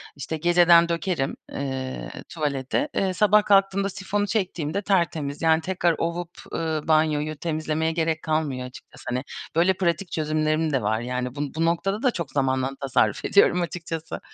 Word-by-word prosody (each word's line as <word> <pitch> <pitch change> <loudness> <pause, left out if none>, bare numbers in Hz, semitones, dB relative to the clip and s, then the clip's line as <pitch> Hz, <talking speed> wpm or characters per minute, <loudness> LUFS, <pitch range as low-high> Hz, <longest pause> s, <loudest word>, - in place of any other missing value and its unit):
işte, 145 +3 -4
geceden 170 0 +5
dökerim, 170 -4 -1 0.2
eee, 130 -2 -4 0.2
tuvalete, 145 - -1
eee, 190 -1 +1
sabah 210 +2 +4
kalktığımda 195 0 +3
sifonu 205 +2 -2
çektiğimde 185 -4 -1
tertemiz, 165 -7 0
yani, 160 0 +4
tekrar 175 -1 +1
ovup, 170 +1 -3 0.2
ııı, 160 -2 -2
banyoyu 155 -1 +2
temizlemeye 155 0 -1
gerek 160 -1 -1
kalmıyor 150 -5 -1
açıkçası. 125 - -14
Hani, 125 +1 -1 0.3
böyle 175 +3 +4
pratik 175 -1 -1
çözümlerim 155 0 0
de 135 - +2
var, 110 +1 0
yani. 125 +1 -3
Bu 145 - -3
bu 165 +1 +1
noktada 195 +6 0
da 255 - +4
çok 170 -9 -5
zamandan 130 -1 0
tasarruf 135 -2 +1
ediyorum 180 -3 +4
açıkçası. 165 -1 -5
160 Hz, 150 wpm, -24 LUFS, 145-175 Hz, 0.3 s, geceden